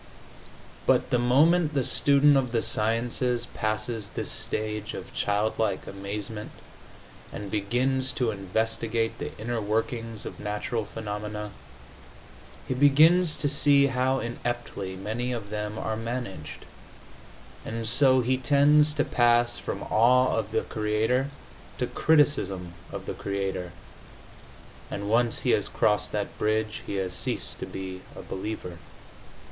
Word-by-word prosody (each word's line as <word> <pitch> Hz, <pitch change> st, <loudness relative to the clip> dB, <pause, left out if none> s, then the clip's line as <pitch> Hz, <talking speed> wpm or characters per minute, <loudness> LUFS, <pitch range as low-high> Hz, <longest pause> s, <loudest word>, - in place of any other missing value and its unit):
But -, -, +3 dB
the 125 Hz, -, +3 dB
moment 150 Hz, +6 st, +4 dB
the 135 Hz, -, +2 dB
student 140 Hz, +3 st, +4 dB
of 130 Hz, -3 st, +1 dB
the 115 Hz, -, +1 dB
sciences 120 Hz, +2 st, 0 dB
passes 110 Hz, -1 st, -3 dB
this -, -, -4 dB
stage 105 Hz, -1 st, -3 dB
of -, -, -8 dB
childlike 105 Hz, 0 st, 0 dB
amazement 100 Hz, +2 st, -6 dB, 0.8 s
and 100 Hz, -1 st, -7 dB
begins 125 Hz, +6 st, 0 dB
to 125 Hz, -4 st, 0 dB
investigate 110 Hz, +3 st, -1 dB
the -, -, -6 dB
inner 115 Hz, +1 st, -3 dB
workings 115 Hz, +1 st, -2 dB
of -, -, -7 dB
natural 105 Hz, +2 st, -2 dB
phenomena, 105 Hz, 0 st, -5 dB, 1.2 s
he -, -, 0 dB
begins 155 Hz, +6 st, +5 dB
to 145 Hz, -, 0 dB
see 140 Hz, 0 st, +5 dB
how 130 Hz, +1 st, +1 dB
ineptly 120 Hz, -5 st, -4 dB
many 110 Hz, +6 st, -3 dB
of 110 Hz, -4 st, -6 dB
them 105 Hz, 0 st, -3 dB
are 110 Hz, -, -2 dB
managed, 110 Hz, -9 st, -5 dB, 1.0 s
and 115 Hz, 0 st, -4 dB
so 130 Hz, +2 st, +5 dB
he 130 Hz, +2 st, +1 dB
tends 150 Hz, +2 st, +4 dB
to 145 Hz, -, +2 dB
pass 120 Hz, 0 st, +3 dB
from -, -, -4 dB
awe 125 Hz, +3 st, +4 dB
of 110 Hz, -2 st, -1 dB
the 110 Hz, -, +1 dB
Creator 110 Hz, +5 st, 0 dB, 0.5 s
to 125 Hz, -, 0 dB
criticism 125 Hz, -, +1 dB, 0.2 s
of -, -, -6 dB
the -, -, -4 dB
Creator, 95 Hz, -2 st, -3 dB, 1.2 s
and 100 Hz, 0 st, -4 dB
once 120 Hz, 0 st, +2 dB
he -, -, +2 dB
has -, -, +2 dB
crossed 105 Hz, 0 st, +1 dB
that 105 Hz, -1 st, -4 dB
bridge 110 Hz, 0 st, 0 dB
he -, -, -3 dB
has 95 Hz, -2 st, -2 dB
ceased -, -, -3 dB
to -, -, -5 dB
be 95 Hz, -1 st, -6 dB
a -, -, -8 dB
believer. 95 Hz, -3 st, -6 dB
115 Hz, 130 wpm, -27 LUFS, 105-125 Hz, 1.2 s, begins